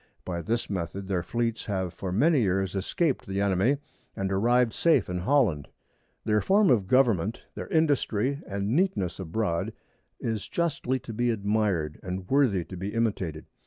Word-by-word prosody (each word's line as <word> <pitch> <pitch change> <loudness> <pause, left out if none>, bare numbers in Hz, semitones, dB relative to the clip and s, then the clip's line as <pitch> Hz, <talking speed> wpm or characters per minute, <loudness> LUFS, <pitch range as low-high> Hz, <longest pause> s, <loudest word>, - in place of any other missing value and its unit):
By 85 -2 -3
this 115 +5 -1
Method 95 +1 -4
their 95 -3 0
Fleets 115 +5 -2
have 95 -4 -2
for 95 +2 -5
many 140 - +3
Years 95 -2 0
escaped 135 - 0
the 95 0 -2
Enemy, 100 +7 +2 0.4
and 95 0 -2
arrived 120 +4 +3
safe 150 - +3
in 90 - -2
Holland. 100 - +2 0.6
Their 105 -1 +2
Form 200 -2 +4
of 105 -6 +2
Government, 115 -5 +2
their - - -6
Industry 140 - +1
and 100 +4 -1
Neatness 150 - 0
abroad, 85 -1 -2 0.5
is 110 -3 -3
justly 170 -6 -1
to 115 - -8
be 120 +2 +1
admired, 100 -8 0
and 90 0 -5
worthy 120 -10 +2
to 95 - -9
be 95 +4 -5
imitated. 95 -9 -1
105 Hz, 160 wpm, -27 LUFS, 95-125 Hz, 0.6 s, Form